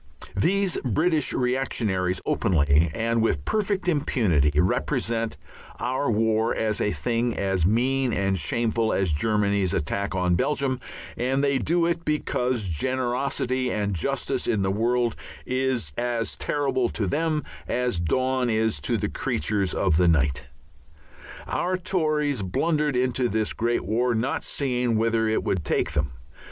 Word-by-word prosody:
These 190 Hz, -, +1 dB
British 155 Hz, -, +1 dB
reactionaries 115 Hz, -8 st, 0 dB
openly, 75 Hz, -1 st, +2 dB
and 115 Hz, +4 st, 0 dB
with 75 Hz, -11 st, 0 dB
perfect 200 Hz, -3 st, -1 dB
impunity, 110 Hz, -, +2 dB
represent 115 Hz, +5 st, 0 dB, 0.4 s
our 130 Hz, +2 st, -1 dB
war 110 Hz, 0 st, +1 dB
as 110 Hz, -1 st, -1 dB
a 105 Hz, -, +1 dB
thing 120 Hz, +1 st, -1 dB
as 95 Hz, -4 st, +1 dB
mean 130 Hz, +4 st, +1 dB
and 95 Hz, -3 st, 0 dB
shameful 115 Hz, +4 st, 0 dB
as 95 Hz, -5 st, +1 dB
Germany's 100 Hz, +1 st, +1 dB
attack 100 Hz, +6 st, -2 dB
on 90 Hz, -1 st, +1 dB
Belgium, 135 Hz, +6 st, 0 dB, 0.4 s
and 135 Hz, +3 st, 0 dB
they 140 Hz, -1 st, +2 dB
do 170 Hz, +6 st, +1 dB
it 170 Hz, 0 st, -1 dB
because 125 Hz, -, -1 dB
generosity 130 Hz, -, -1 dB
and 105 Hz, -1 st, -1 dB
justice 85 Hz, -, -1 dB
in 100 Hz, -3 st, +1 dB
the 95 Hz, -, +1 dB
world 120 Hz, +2 st, +1 dB, 0.3 s
is 130 Hz, -, -1 dB
as 120 Hz, -2 st, -1 dB
terrible 135 Hz, -4 st, 0 dB
to 105 Hz, -, -2 dB
them 155 Hz, -, 0 dB, 0.2 s
as 125 Hz, -7 st, 0 dB
dawn 130 Hz, +8 st, 0 dB
is 110 Hz, -6 st, +1 dB
to -, -, 0 dB
the -, -, -1 dB
creatures 100 Hz, +4 st, -1 dB
of 90 Hz, -5 st, +2 dB
the 90 Hz, 0 st, +4 dB
night. 75 Hz, -6 st, +2 dB, 1.0 s
Our 185 Hz, +1 st, -1 dB
Tories 155 Hz, -, 0 dB
blundered 150 Hz, -, 0 dB
into 125 Hz, 0 st, +1 dB
this 110 Hz, +1 st, 0 dB
great 120 Hz, +1 st, -1 dB
war, 120 Hz, +3 st, +1 dB
not 115 Hz, +4 st, -1 dB
seeing 125 Hz, -4 st, 0 dB
whither 115 Hz, 0 st, +1 dB
it 110 Hz, -, 0 dB
would 90 Hz, -4 st, -1 dB
take 70 Hz, -, 0 dB
them. 75 Hz, -2 st, -1 dB
115 Hz, 140 wpm, -25 LUFS, 100-130 Hz, 1.0 s, the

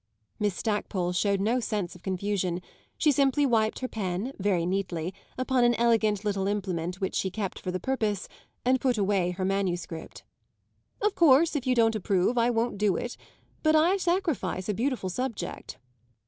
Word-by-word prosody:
Miss 205 Hz, -3 st, 0 dB
Stackpole 200 Hz, -5 st, -1 dB
showed 200 Hz, +2 st, +1 dB
no 225 Hz, +6 st, +1 dB
sense 210 Hz, -7 st, -2 dB
of 180 Hz, -, -14 dB
confusion; 185 Hz, -1 st, -1 dB, 0.4 s
she 305 Hz, -, +4 dB
simply 280 Hz, +1 st, +3 dB
wiped 220 Hz, -4 st, +2 dB
her 255 Hz, -, -1 dB
pen, 205 Hz, +3 st, -3 dB
very 185 Hz, -4 st, +1 dB
neatly, 180 Hz, -2 st, -2 dB, 0.2 s
upon 255 Hz, -1 st, +2 dB
an 240 Hz, 0 st, +4 dB
elegant 220 Hz, -3 st, +2 dB
little 195 Hz, -2 st, 0 dB
implement 185 Hz, -3 st, -2 dB
which 190 Hz, -, -2 dB
she 190 Hz, -, 0 dB
kept 195 Hz, 0 st, -4 dB
for -, -, -5 dB
the 185 Hz, 0 st, -2 dB
purpose, 215 Hz, -6 st, -1 dB, 0.4 s
and 255 Hz, 0 st, +3 dB
put 250 Hz, -3 st, +2 dB
away 195 Hz, -3 st, +1 dB
her 185 Hz, +1 st, -2 dB
manuscript. 180 Hz, -4 st, -3 dB, 0.8 s
"Of 420 Hz, -1 st, +3 dB
course 320 Hz, 0 st, +5 dB
if 270 Hz, -3 st, -2 dB
you 255 Hz, -, +3 dB
don't 225 Hz, -1 st, +4 dB
approve 200 Hz, +2 st, +1 dB
I 235 Hz, 0 st, +3 dB
won't 230 Hz, -3 st, 0 dB
do 205 Hz, -3 st, +2 dB
it; 245 Hz, -, -4 dB, 0.5 s
but 310 Hz, 0 st, +3 dB
I 340 Hz, +5 st, +4 dB
sacrifice 335 Hz, -, -1 dB
a 210 Hz, -, 0 dB
beautiful 235 Hz, -4 st, -1 dB
subject." 235 Hz, -5 st, -4 dB
210 Hz, 170 wpm, -28 LUFS, 185-250 Hz, 0.8 s, course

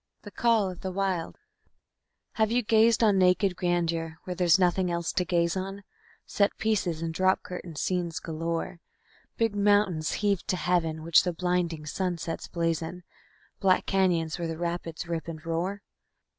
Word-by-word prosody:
_ -, -, -46 dB
The 205 Hz, -, -9 dB
Call 230 Hz, -4 st, +2 dB
of 180 Hz, -, -11 dB
the 190 Hz, -, -3 dB
Wild 185 Hz, -3 st, -2 dB, 0.9 s
Have 220 Hz, -1 st, +1 dB
you 245 Hz, +1 st, +2 dB
gazed 225 Hz, +1 st, +4 dB
on 205 Hz, -3 st, +4 dB
naked 185 Hz, +1 st, +3 dB
grandeur 170 Hz, -2 st, -1 dB
where 180 Hz, -, -4 dB
there's 175 Hz, 0 st, +4 dB
nothing 180 Hz, 0 st, +2 dB
else 170 Hz, -1 st, -2 dB
to 180 Hz, -, +1 dB
gaze 170 Hz, -1 st, +1 dB
on, 195 Hz, +2 st, -5 dB, 0.4 s
Set 200 Hz, 0 st, +1 dB
pieces 195 Hz, -7 st, 0 dB
and 165 Hz, -1 st, -3 dB
drop 185 Hz, +3 st, +2 dB
curtain 180 Hz, -2 st, -7 dB
scenes 175 Hz, +1 st, -1 dB
galore, 165 Hz, +1 st, -4 dB, 0.6 s
Big 225 Hz, -2 st, +1 dB
mountains 200 Hz, -6 st, +2 dB
heaved 200 Hz, -3 st, 0 dB
to 185 Hz, -, 0 dB
heaven, 165 Hz, -3 st, 0 dB
which 165 Hz, 0 st, +5 dB
the 180 Hz, -, -2 dB
blinding 175 Hz, -3 st, -1 dB
sunsets 170 Hz, +1 st, -3 dB
blazon, 165 Hz, +1 st, -2 dB, 0.6 s
Black 185 Hz, -1 st, +3 dB
canyons 175 Hz, -4 st, +1 dB
where 170 Hz, -, -2 dB
the 165 Hz, -1 st, -4 dB
rapids 170 Hz, -1 st, -4 dB
rip 165 Hz, -1 st, -3 dB
and 160 Hz, -1 st, -7 dB
roar? 180 Hz, +5 st, -2 dB
180 Hz, 160 wpm, -27 LUFS, 165-195 Hz, 0.9 s, which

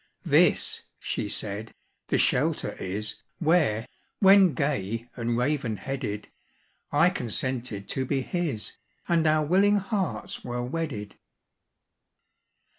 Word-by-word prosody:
"This," -, -, +3 dB
she -, -, -3 dB
said, 105 Hz, +1 st, -3 dB, 0.3 s
"the -, -, +2 dB
shelter -, -, +2 dB
is, 105 Hz, +3 st, -4 dB, 0.2 s
Where, 155 Hz, -10 st, +2 dB, 0.3 s
when 195 Hz, -5 st, +6 dB
gay 115 Hz, -5 st, -1 dB
and 120 Hz, -1 st, -1 dB
raven 125 Hz, -3 st, 0 dB
headed, 110 Hz, -1 st, -4 dB, 0.6 s
I -, -, +4 dB
consented 120 Hz, -3 st, -3 dB
to 130 Hz, -, -1 dB
be 135 Hz, 0 st, 0 dB
his, 165 Hz, -, -3 dB, 0.3 s
And 165 Hz, -2 st, +3 dB
our 155 Hz, 0 st, +3 dB
willing 200 Hz, +6 st, +4 dB
hearts 195 Hz, -3 st, -3 dB
were 120 Hz, 0 st, -3 dB
wedded. 125 Hz, -7 st, -4 dB
130 Hz, 110 wpm, -27 LUFS, 110-165 Hz, 0.6 s, when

